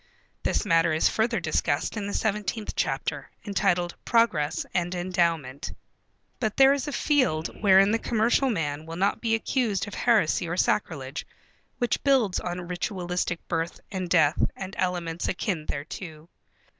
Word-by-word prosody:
This - - 0
matter 165 -3 +3
is 155 - +3
further 230 +1 +1
discussed - - 0
in 205 -2 -3
the 205 - -4
seventeenth 210 0 -2
chapter, - - -2 0.2
entitled 180 -4 +1
"Progress 215 -11 +2
and 175 0 0
Endowment." 170 -7 -1 0.7
But 220 -3 -1
there 270 0 +7
is 280 -1 -2
a - - -2
field 255 - 0
wherein 195 0 +6
the 225 - +2
commercial 235 +4 +2
man 155 -7 -2
will 165 - -6
not 195 +4 0
be 225 -1 +2
accused 225 -6 -1
of 205 - -8
heresy 205 -7 +2
or 175 - -2
sacrilege, 150 -8 -1 0.5
which 245 -2 0
builds 260 -9 +3
on 180 0 -4
ritualistic 180 -1 -3
birth 165 0 -2
and 185 -3 -3
death 160 -3 +3
and 190 0 -7
elements 175 -2 -1
akin 175 -4 -2
thereto. 155 +2 -6
180 Hz, 145 wpm, -26 LUFS, 165-220 Hz, 0.7 s, there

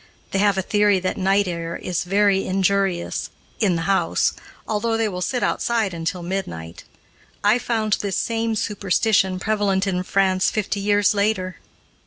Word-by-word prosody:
They 195 - 0
have 200 -1 +3
a 190 - 0
theory 205 -1 +3
that 185 - -1
night 195 +1 +2
air 170 -1 -4
is 180 -2 -3
very 195 +1 +3
injurious, 190 -1 0 0.3
in 195 -6 +2
the 165 - -2
house, 195 +2 +1 0.3
although 225 +1 0
they 225 -1 +1
will 180 -3 -4
sit 245 +6 -1
outside 225 -5 0
until 170 +1 -3
midnight. 85 - -5 0.6
I 210 +4 +4
found 220 -3 -1
this 200 -2 -2
same 230 -1 -1
superstition 195 -1 +1
prevalent 205 -1 +1
in 185 -2 -1
France 190 0 +2
fifty 210 -1 -2
years 205 0 +3
later. 200 -4 0
195 Hz, 155 wpm, -22 LUFS, 185-210 Hz, 0.6 s, I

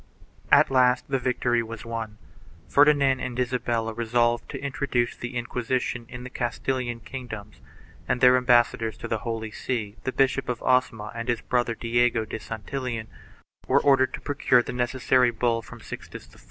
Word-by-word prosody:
2 - - +8
At - - +4
last 125 -1 +3
the 135 - +2
victory 125 -1 +1
was 115 0 -8
won. 115 -2 -5 0.5
Ferdinand 140 -2 +4
and 125 -1 -4
Isabella 120 -3 -1
resolved 120 +1 +1
to - - -5
introduce 135 -3 -1
the 125 +1 -7
Inqui 120 +1 -3
sition 125 -1 -2
in 120 0 -8
the 130 - -8
Castilian 120 0 -2
kingdoms 110 -5 -8 0.5
and 125 - 0
their 125 0 +7
ambassadors 120 -3 +2
to - - -6
the 110 - -1
Holy 110 -1 -4
See, 110 -3 -4
the 130 - -1
Bishop 135 0 +1
of 120 -1 -3
Osma 115 -4 +1
and 115 0 -5
his 120 -2 0
brother 120 -2 0
Diego 115 0 +1
de 110 - -6
Santillan, 115 +1 -5 0.6
were - - +4
ordered 135 -2 +4
to - - -11
procure 130 -3 +2
the - - -6
necessary 125 0 +2
bull 115 0 0
from - - -12
Sixtus - - -9
IV. - - -18
120 Hz, 170 wpm, -25 LUFS, 115-130 Hz, 0.6 s, 2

